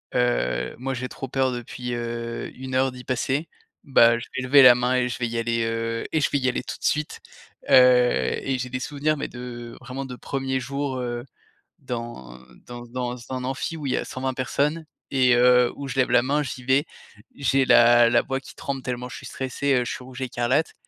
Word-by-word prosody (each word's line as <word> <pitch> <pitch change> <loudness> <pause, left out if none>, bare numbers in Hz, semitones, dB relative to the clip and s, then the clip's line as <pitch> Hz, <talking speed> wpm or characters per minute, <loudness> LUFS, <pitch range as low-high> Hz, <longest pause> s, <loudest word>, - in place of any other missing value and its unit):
heu, - - 0
moi 135 +2 -3
j'ai 130 0 -4
trop 135 - -7
peur 130 0 +1
depuis, 125 0 -5
heu, 115 0 -4
1 130 0 -6
heure 130 0 +2
d'y 125 0 -10
passer, 135 +5 -1 0.3
ben 120 -5 +5
je 115 - -7
vais 130 -1 -2
lever 140 +1 +7
la 125 - +10
main 125 +1 0
et 125 -1 +1
je 125 - -5
vais 120 - 0
y 115 - -4
aller, 115 0 0
heu 115 0 -2
et 155 - +2
je - - +2
vais 140 - +2
y 130 - 0
aller 125 - -1
tout - - -6
de - - -7
suite». 150 0 -1 0.5
Heu - - +7 0.7
et 135 -1 +1
j'ai 125 0 -4
des 130 +1 -3
souvenirs 150 +3 -1
mais - - -3
de 120 -1 -8
vraiment 135 +1 -6
de 125 -1 -7
1ers 135 +1 -3
jours 140 +1 -3
heu, 120 0 -4 0.5
dans 115 - -7 0.3
dans 120 0 -9
dans 125 0 -4
un 130 -1 -4
amphi 135 +5 -3
où 150 - -7
il 130 - -1
y - - +1
a - - -1
120 130 0 -3
personnes 145 +6 -1 0.3
et 130 -2 +4
heu, 125 0 +5
où 140 - -6
je 135 - -5
lève 130 -1 +3
la 120 0 +5
main. 145 +3 +1
J'y 130 -3 -6
vais, 135 +3 +2 0.5
j'ai 135 -1 +2
la 120 -1 +6
la 120 0 +3
voix 135 -1 -2
qui 135 - -14
tremble 135 -1 -4
tellement 125 0 -4
je - - -8
suis - - -9
stressé, 135 +1 -1
heu, 125 -1 +1
je - - -3
suis - - -8
rouge 130 +1 -10
écarlate 130 +4 0
125 Hz, 225 wpm, -24 LUFS, 120-135 Hz, 0.7 s, la